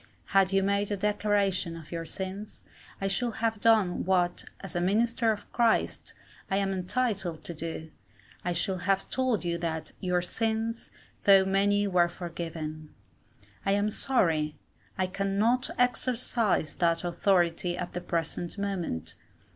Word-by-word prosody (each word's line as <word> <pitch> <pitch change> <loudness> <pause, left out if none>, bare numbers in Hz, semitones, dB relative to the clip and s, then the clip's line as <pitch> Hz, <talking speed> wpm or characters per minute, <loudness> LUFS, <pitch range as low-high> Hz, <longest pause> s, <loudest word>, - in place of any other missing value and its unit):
Had 195 -1 +5
you 195 0 +3
made 200 +1 +1
a 205 - -1
declaration 205 -3 +1
of 160 -2 -12
your 165 -1 -4
sins, 195 +3 -6 0.4
I 195 - -1
should 230 +4 0
have 225 -1 0
done 215 -5 +3
what, 180 -1 +1 0.2
as 195 -2 -8
a 175 - +1
minister 225 +5 +2
of 210 - -6
Christ, 235 -2 +1 0.3
I 195 - +1
am 195 -1 +1
entitled 190 -3 -1
to 170 - -5
do 160 0 -5 0.5
I 180 - -1
should 180 +1 -1
have 195 +1 0
told 255 -7 0
you 170 0 -1
that 160 -2 -3
"your 180 -2 0
sins 225 +3 -2 0.4
though 195 -1 +7
many 200 +1 +2
were 180 -3 +3
forgiven." 165 -3 -6 0.7
I 195 - +2
am 205 +1 +1
sorry 165 - +1 0.4
I 185 - +2
cannot 200 +6 +1
exercise 245 -7 +1
that 170 -1 +2
authority 175 -1 +1
at 180 - -4
the 180 - -3
present 170 +1 -3
moment. 175 - -2
195 Hz, 145 wpm, -29 LUFS, 175-210 Hz, 0.7 s, though